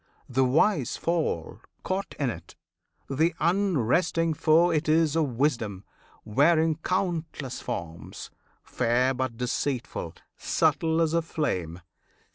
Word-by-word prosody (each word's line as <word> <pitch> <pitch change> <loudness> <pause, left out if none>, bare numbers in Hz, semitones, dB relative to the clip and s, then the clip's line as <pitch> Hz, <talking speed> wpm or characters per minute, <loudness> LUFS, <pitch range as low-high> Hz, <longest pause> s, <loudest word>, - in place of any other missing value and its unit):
The 130 +1 +1
wise 140 - +2
fall, 165 - -2 0.2
caught 190 +1 -3
in 135 -4 +1
it; 85 -5 -11 0.5
the 160 +6 +1
unresting 165 - +1
foe 160 +3 +4
It 155 -1 0
is 160 -1 +3
of 145 -8 0
wisdom, 115 -9 0 0.4
wearing 155 +7 +3
countless 165 -6 -3
forms, 85 -1 -6 0.3
Fair 125 +2 +1
but 130 -2 -3
deceitful, 125 +1 -3 0.2
subtle 160 0 +1
as 160 -1 +1
a 170 - +3
flame. 90 - -3
150 Hz, 110 wpm, -27 LUFS, 125-165 Hz, 0.5 s, foe